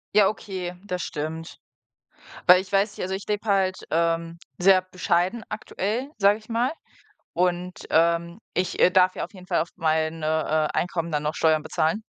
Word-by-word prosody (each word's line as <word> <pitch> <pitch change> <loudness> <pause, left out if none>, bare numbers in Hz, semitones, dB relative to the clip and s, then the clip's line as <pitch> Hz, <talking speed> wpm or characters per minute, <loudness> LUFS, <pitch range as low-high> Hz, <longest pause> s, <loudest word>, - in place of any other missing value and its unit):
Ja, 210 -2 +6
okay, 185 -4 -5
das 180 -3 -3
stimmt. 155 0 -5 0.9
Weil 180 +1 +8
ich 190 - -13
weiß 200 +1 +2
nicht - - -4
also, 185 +1 -3
ich 195 +1 -5
lebe 210 +1 -2
halt, 190 -2 +2
ähm, 165 0 0 0.2
sehr 185 +1 +5
bescheiden 185 +3 -1
aktuell, 215 +5 -3
sage 205 +1 +4
ich 215 - -21
mal. 235 +2 +1 0.6
Und, 180 0 -1
ähm, 170 +3 +2
ich, 180 0 -1
äh, - - +6
darf 185 0 +4
ja - - -3
auf - - -12
jeden 185 -1 -12
Fall - - +1
auf 165 - -2
meine, 160 -1 0 0.4
äh, - - -1
Einkommen 170 -1 -2
dann 150 -1 0
noch 150 +1 -2
Steuern 155 -1 +2
bezahlen. 160 +5 0
180 Hz, 180 wpm, -25 LUFS, 165-195 Hz, 0.9 s, Weil